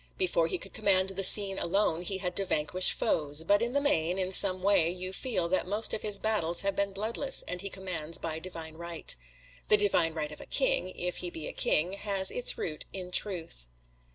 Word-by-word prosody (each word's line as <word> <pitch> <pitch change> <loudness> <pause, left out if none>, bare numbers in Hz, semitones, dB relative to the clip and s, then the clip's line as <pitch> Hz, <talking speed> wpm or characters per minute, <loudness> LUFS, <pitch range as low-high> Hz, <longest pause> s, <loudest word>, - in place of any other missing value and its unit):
Before 405 +7 0
he 370 - -3
could - - -11
command 195 -3 +1
the 195 0 -4
scene 195 0 +6
alone, 175 -2 0
he 190 +2 -3
had 180 -2 -5
to 200 - +2
vanquish 180 +2 +2
foes; 150 0 0
but 205 +5 +2
in 235 +1 -2
the 285 - +2
main, 180 - 0
in 185 -1 0
some 185 -1 +4
way, 195 -5 +3
you 185 +1 -5
feel 210 -7 -2
that 185 0 -1
most 210 +3 0
of - - -2
his 210 -1 +1
battles 195 -6 0
have 200 0 -2
been 200 0 -1
bloodless 225 +7 +1
and 180 0 -5
he 200 - -5
commands 180 -5 -2
by 160 -1 -5
divine 160 -2 -9
right. 170 -1 -1 0.5
The 210 - +5
Divine 175 -6 +1
Right 155 -1 -4
of 150 - -11
a - - -12
King, - - +1
if 180 0 -3
he 180 - -1
be 160 -2 -7
a - - -7
King, 170 +5 +2
has 200 -1 +1
its 245 - +2
root 155 -2 -5
in 185 -2 -8
truth. 170 - 0
185 Hz, 215 wpm, -28 LUFS, 170-205 Hz, 0.5 s, scene